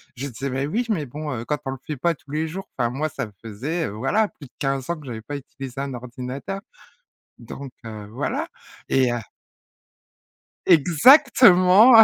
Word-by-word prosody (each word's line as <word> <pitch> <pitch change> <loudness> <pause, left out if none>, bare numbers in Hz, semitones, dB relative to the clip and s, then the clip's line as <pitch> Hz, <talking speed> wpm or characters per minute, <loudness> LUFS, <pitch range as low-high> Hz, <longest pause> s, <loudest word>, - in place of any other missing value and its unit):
je 135 +3 -4
disais: 135 +2 -4
«Mais 135 +2 -1
oui, 235 +9 0
mais 160 -9 0
bon, 150 +2 -5
heu, 115 -1 -4
quand 150 - -1
on 135 - -2
le 135 - -5
fait 150 -4 -4
pas 170 +4 +1
tous 135 +2 -17
les 155 +1 -1
jours», 190 +4 -6
enfin 120 -2 +1
moi 150 +5 -2
ça - - -4
me 105 - -14
faisait, 135 +10 -3
voilà, 135 - +1
plus 140 - -13
de - - -33
15 135 0 -1
ans 170 - 0
que 145 - -13
j'avais 110 -2 -5
pas 145 +6 -6
utilisé 135 -1 -7
un 140 -2 -4
ordinateur, 125 +10 -6 0.8
donc, 135 -2 -9
heu, 105 -2 -7
voilà. 130 +6 -2 0.4
Et 130 -2 +3
heu. 120 - -1 1.5
Exactement, 185 - +7
140 Hz, 185 wpm, -23 LUFS, 125-170 Hz, 1.5 s, Exactement